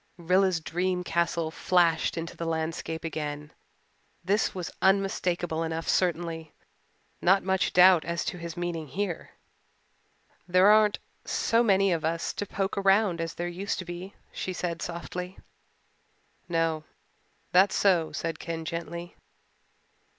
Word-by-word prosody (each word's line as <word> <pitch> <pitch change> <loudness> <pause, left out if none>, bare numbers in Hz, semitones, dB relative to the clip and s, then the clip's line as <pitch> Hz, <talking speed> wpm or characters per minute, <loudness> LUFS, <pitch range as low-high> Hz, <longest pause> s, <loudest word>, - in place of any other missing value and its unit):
Rilla's 180 +1 +2
dream 180 +3 -1
castle 170 -1 0
flashed 170 -2 +2
into 165 0 -5
the 165 - -4
landscape 160 0 -3
again. 150 -2 -5 0.7
This 200 +2 +1
was 180 -2 -4
unmistakable 180 -4 +1
enough 165 0 -3
certainly 165 -3 0 0.7
not 190 +2 +4
much 190 0 +1
doubt 180 -2 +7
as 170 0 -2
to 180 - -4
his 170 0 -7
meaning 170 -3 -3
here. 175 +4 -3 1.2
"There 185 +1 +4
aren't 215 -1 +5 0.3
so 230 +1 +1
many 195 -4 +3
of 165 -2 0
us 165 +1 -1
to 205 - -4
poke 195 +1 -2
around 195 -3 +3
as 165 -1 -4
there 175 - -3
used 185 +3 -3
to 185 - -5
be," 175 +3 -7 0.2
she 185 - -4
said 170 -2 -3
softly. 175 +2 -5 1.1
"No, 165 -2 0 0.7
that's 190 +2 +5
so," 175 -5 +3
said 165 -2 -4
Ken 165 -1 -5
gently. 170 +1 -5
175 Hz, 130 wpm, -28 LUFS, 165-185 Hz, 1.2 s, doubt